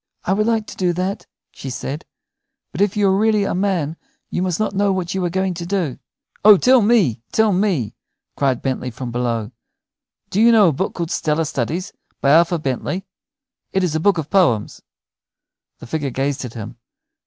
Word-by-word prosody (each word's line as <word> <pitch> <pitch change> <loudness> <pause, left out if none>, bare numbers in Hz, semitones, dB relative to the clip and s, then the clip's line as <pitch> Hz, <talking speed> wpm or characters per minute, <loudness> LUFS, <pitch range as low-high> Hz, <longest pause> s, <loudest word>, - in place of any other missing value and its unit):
"I 190 - +2
would 215 +2 +1
like 225 -2 +1
to - - -10
do 180 -2 0
that," 185 +3 -3 0.2
she 135 - -8
said, 135 +4 -5 0.7
"but 160 - -4
if 205 0 +1
you 205 -1 +3
are 190 - +3
really 215 0 +2
a - - -1
man 180 -5 -1 0.3
you - - -1
must 180 -1 -1
not 215 -2 0
know 200 0 +2
what 185 -2 -2
you 190 -1 -1
are - - 0
going 190 +1 -1
to 170 0 -6
do." 175 -9 -2 0.4
"Oh, 210 -1 +9
tell 255 +5 +5
me, 200 - +3
tell 220 -2 +3
me," 180 - 0 0.4
cried 135 -3 0
Bentley 130 -1 -2
from 120 +1 -6
below, 115 -2 -2 0.8
"do 205 - +1
you 235 +1 +7
know 210 -6 +6
a - - -1
book 190 +8 -3
called 170 -2 -3
'Stellar 155 +1 0
Studies,' 155 +7 -3 0.3
by 140 - +3
Arthur 170 +2 +4
Bentley? 155 +6 -3 0.7
It 190 - +1
is 175 -4 0
a 160 - 0
book 195 +2 +3
of 155 -2 -4
poems." 160 - +2 1.0
The - - -11
figure 145 +1 -2
gazed 135 +1 -2
at 120 - -9
him. 115 +1 -7
175 Hz, 195 wpm, -20 LUFS, 135-200 Hz, 1.0 s, Oh